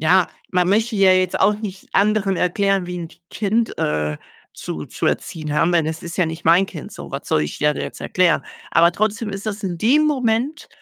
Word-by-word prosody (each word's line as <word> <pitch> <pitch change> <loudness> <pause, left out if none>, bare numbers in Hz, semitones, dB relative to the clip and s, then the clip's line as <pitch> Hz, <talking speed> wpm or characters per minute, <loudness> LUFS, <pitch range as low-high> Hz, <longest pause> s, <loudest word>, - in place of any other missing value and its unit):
ja, 180 +3 +4 0.2
man 180 -1 +2
möchte 220 +3 +1
ja 195 -2 +5
jetzt 185 -1 +1
auch 205 +2 +4
nicht 200 -3 -7
anderen 200 -1 +2
erklären, 195 +1 +1
wie 180 - -5
'n 165 - -6 0.2
Kind, 220 +2 0
äh, 75 0 -1 0.4
zu 75 - -6
zu - - -3
erziehen 155 -2 -2
haben, 165 +4 +2
denn 165 -3 +2
es 160 0 -4
ist 170 -1 -6
ja 180 - +3
nicht 160 +1 -6
mein 175 +4 +5
Kind 160 -6 -9
so. - - -9
Was - - -6
soll - - +2
ich 75 - -5
der 150 0 +2
da - - -5
jetzt - - -7
erklären? 175 -6 +2 0.3
Aber 170 +1 +5
trotzdem 215 +3 -1
ist 195 +1 -6
das 215 0 -4
in 175 -3 -2
dem 255 - +3
Moment 255 0 0
185 Hz, 215 wpm, -20 LUFS, 165-210 Hz, 0.4 s, ja